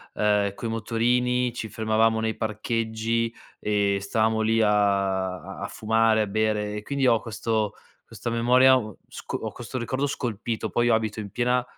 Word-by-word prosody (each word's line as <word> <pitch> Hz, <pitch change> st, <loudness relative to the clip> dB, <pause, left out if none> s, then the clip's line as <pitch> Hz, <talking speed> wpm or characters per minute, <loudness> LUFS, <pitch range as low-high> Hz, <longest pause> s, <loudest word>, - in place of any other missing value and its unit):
ehm, 105 Hz, -1 st, +1 dB
coi 115 Hz, -, -5 dB
motorini, 120 Hz, +2 st, +1 dB
ci 110 Hz, -2 st, -5 dB
fermavamo 110 Hz, +1 st, +2 dB
nei 110 Hz, 0 st, -1 dB
parcheggi 115 Hz, +1 st, -1 dB, 0.3 s
e 100 Hz, -1 st, +1 dB
stavamo 110 Hz, +2 st, +1 dB
lì 110 Hz, +1 st, +2 dB
a 100 Hz, -3 st, +2 dB
a -, -, -9 dB
a -, -, -4 dB
fumare, 110 Hz, 0 st, +2 dB
a 105 Hz, -, 0 dB
bere 105 Hz, 0 st, 0 dB
e -, -, -4 dB
quindi 140 Hz, +3 st, -1 dB
ho 115 Hz, -2 st, +4 dB
questo 110 Hz, -1 st, -2 dB, 0.3 s
questa 115 Hz, -, -6 dB
memoria, 125 Hz, +3 st, +5 dB
uhm, 110 Hz, -4 st, -5 dB
sco -, -, -6 dB
ho -, -, -5 dB
questo 120 Hz, +2 st, -7 dB
ricordo 130 Hz, +4 st, -1 dB
scolpito, 115 Hz, -4 st, -3 dB
poi 120 Hz, 0 st, +2 dB
io 115 Hz, -, +5 dB
abito 110 Hz, -1 st, -2 dB
in 105 Hz, -1 st, -6 dB
piena 125 Hz, +4 st, +1 dB
110 Hz, 170 wpm, -25 LUFS, 105-120 Hz, 0.3 s, memoria